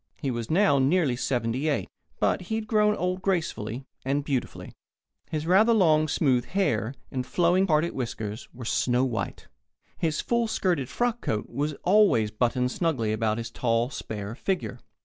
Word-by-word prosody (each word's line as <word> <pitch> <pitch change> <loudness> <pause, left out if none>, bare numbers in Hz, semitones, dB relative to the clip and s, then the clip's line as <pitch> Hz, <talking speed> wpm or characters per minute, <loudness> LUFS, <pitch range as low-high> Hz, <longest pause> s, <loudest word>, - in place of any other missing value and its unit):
He 140 -4 -2
was 120 -2 -4
now 170 -4 +4
nearly 140 -1 +2
seventy 125 +2 -1
eight, 145 - -1 0.3
but - - +1
he 220 - 0
had 220 -1 -2
grown 210 -1 +3
old 180 0 -2
gracefully 140 - -2 0.2
and 140 +2 0
beautifully. 135 -3 -3 0.6
His 155 -1 -3
rather 205 +7 +5
long, 155 -6 +4
smooth 130 -5 +2
hair 130 - 0 0.2
and 130 -1 -2
flowing, 175 +7 +2
parted 160 +1 +2
whiskers 110 -3 -5
were 125 -1 -9
snow 125 +2 +1
white. 120 -3 -4 0.5
His 160 -2 0
full 235 -1 +1
skirted 175 - 0
frock 240 - -1
croak 105 -1 -2
was 145 +4 -2
always 185 - +4
buttoned 125 +3 0
snugly 130 -12 0
about 110 0 0
his 115 -1 -5
tall, 115 +1 0
spare 105 -4 -5
figure. 145 -3 -3
140 Hz, 160 wpm, -26 LUFS, 120-180 Hz, 0.6 s, rather